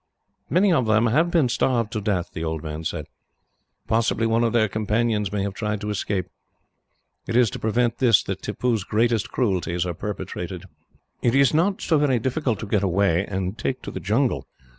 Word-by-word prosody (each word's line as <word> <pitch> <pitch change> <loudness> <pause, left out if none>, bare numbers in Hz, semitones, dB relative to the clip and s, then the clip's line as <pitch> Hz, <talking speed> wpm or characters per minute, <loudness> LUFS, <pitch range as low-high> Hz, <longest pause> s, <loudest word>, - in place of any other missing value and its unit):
"Many 185 - +4
of 130 -8 +2
them 110 +1 +3
have 150 +9 +3
been 165 -6 +3
starved 120 -2 0
to 110 - -3
death," 95 -4 -1
the 80 - -4
old 80 -1 -3
man 75 0 -5
said. - - -3 0.8
"Possibly 115 0 +1
one 115 +1 +2
of 115 - +2
their 115 -2 +3
companions 105 0 0
may 100 -1 -1
have 100 -1 -3
tried 105 0 -2
to 105 0 -3
escape. 100 -2 -2 1.0
It 115 - -2
is 120 -4 +4
to - - -6
prevent 115 +2 0
this 120 -5 +5
that 95 - -4
Tippoo's 110 +1 -1
greatest 115 +1 +1
cruelties 90 -7 0
are 90 - -2
perpetrated. 90 -2 -5 0.6
It 120 +1 +2
is 140 +1 +4
not 180 +5 +1
so 160 -3 +2
very 140 -4 +2
difficult 125 0 -1
to - - -4
get 100 -1 +1
away, 95 -1 +1
and 95 +2 -3
take 130 +4 -2
to - - -6
the - - -5
jungle. - - 0
110 Hz, 190 wpm, -23 LUFS, 95-120 Hz, 1.0 s, this